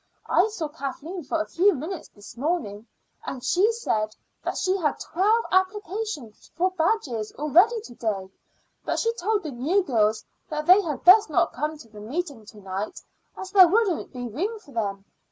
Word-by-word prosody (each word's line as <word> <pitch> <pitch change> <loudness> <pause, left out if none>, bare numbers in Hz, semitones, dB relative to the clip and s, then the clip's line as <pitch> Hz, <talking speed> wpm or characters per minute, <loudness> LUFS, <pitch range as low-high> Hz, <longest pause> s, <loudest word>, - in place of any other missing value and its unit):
I 365 - +3
saw 415 -8 -4
Kathleen 310 +4 -6
for 280 +4 -1
a 320 - -1
few 390 +2 +3
minutes 320 +6 -6
this 205 -1 -14
morning, 235 - -2 0.4
and 255 -2 -6
she 400 +6 +3
said 215 - -2 0.3
that - - -3
she 375 0 +1
had 310 -6 -1
twelve 425 +7 +1
applications 375 - -2
for 365 +3 +1
badges 320 - -1
already 355 - +4
to 250 - -11
day, 200 -5 -3 0.5
but - - -1
she 460 0 +1
told 430 -1 -1
the 305 - -5
new 305 +11 +1
girls 220 - +1 0.2
that 305 0 -3
they 370 +3 +7
had 305 -8 -4
best 375 +1 +8
not 295 - +2
come 305 +3 -3
to 260 - -14
the 210 -1 -12
meeting 270 - -5
to 220 - -13
night, 195 +1 -5 0.4
as 380 0 -7
there 380 -3 +8
wouldn't 395 -1 +1
be 245 -2 -5
room 370 - -3
for 415 -10 -17
them. 200 -5 -3
315 Hz, 180 wpm, -25 LUFS, 235-380 Hz, 0.5 s, best